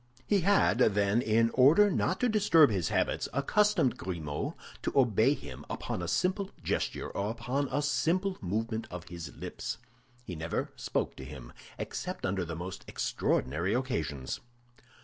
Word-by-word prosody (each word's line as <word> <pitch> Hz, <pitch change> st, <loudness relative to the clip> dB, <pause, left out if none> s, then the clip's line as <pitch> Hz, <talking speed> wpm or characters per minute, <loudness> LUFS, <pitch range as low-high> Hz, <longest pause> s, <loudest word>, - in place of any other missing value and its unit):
He 205 Hz, -, +3 dB
had, 195 Hz, -, +3 dB
then, 105 Hz, -1 st, +3 dB
in 115 Hz, 0 st, +3 dB
order 160 Hz, +11 st, +6 dB
not 185 Hz, +1 st, 0 dB
to 250 Hz, -, +4 dB
disturb 195 Hz, -, +5 dB
his 90 Hz, -6 st, 0 dB
habits, -, -, 0 dB
accustomed 205 Hz, -, +2 dB
Grimaud 80 Hz, -5 st, -4 dB, 0.3 s
to -, -, -1 dB
obey 125 Hz, +1 st, +4 dB
him 70 Hz, -, -9 dB
upon -, -, -3 dB
a 85 Hz, -, -3 dB
simple 190 Hz, -, 0 dB
gesture -, -, -2 dB
or 100 Hz, +1 st, -2 dB
upon 130 Hz, +5 st, -2 dB
a 145 Hz, -, 0 dB
simple 185 Hz, +6 st, +1 dB
movement 110 Hz, +4 st, -2 dB
of 90 Hz, -1 st, -8 dB
his 85 Hz, -1 st, -7 dB
lips. -, -, -5 dB, 0.5 s
He 90 Hz, -7 st, -6 dB
never 80 Hz, +1 st, -3 dB
spoke -, -, -2 dB
to -, -, -7 dB
him, 65 Hz, -3 st, -9 dB, 0.2 s
except -, -, -4 dB
under 95 Hz, -1 st, 0 dB
the 80 Hz, -1 st, -5 dB
most 90 Hz, +3 st, -6 dB
extraordinary 80 Hz, -, 0 dB
occasions. 80 Hz, -, -2 dB
110 Hz, 150 wpm, -30 LUFS, 85-145 Hz, 0.5 s, order